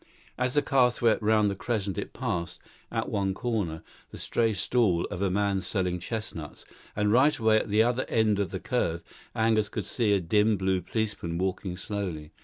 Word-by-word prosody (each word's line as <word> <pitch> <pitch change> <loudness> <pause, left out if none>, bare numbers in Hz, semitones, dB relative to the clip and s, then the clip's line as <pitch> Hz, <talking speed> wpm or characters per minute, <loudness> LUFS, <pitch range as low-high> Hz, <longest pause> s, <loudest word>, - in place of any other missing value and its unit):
As 125 +1 -1
the 145 - +3
car 130 -3 +4
swept 120 -2 +1
round 105 0 +3
the 100 - -1
crescent 100 -3 -2
it - - -4
passed, 85 -1 -3 0.3
at - - -1
one 95 -2 -1
corner, 100 -11 -2 0.3
the - - -10
stray 115 -1 +1
stall 100 -2 +1
of 90 - -4
a 100 - +2
man 100 0 +1
selling 90 -1 -1
chestnuts; 90 -6 -6 0.3
and 105 0 +1
right 135 +6 +4
away 110 -1 +4
at 110 - -1
the 105 +2 +4
other 125 +2 0
end 110 -2 +2
of 100 -3 0
the 95 - -4
curve, 85 -8 -1 0.3
Angus 110 -2 +2
could - - -4
see 110 -4 +1
a 100 - +3
dim 105 +4 +2
blue 95 0 0
policeman 100 -4 -3
walking 95 0 -2
slowly. 90 -6 -5
105 Hz, 190 wpm, -28 LUFS, 90-110 Hz, 0.3 s, car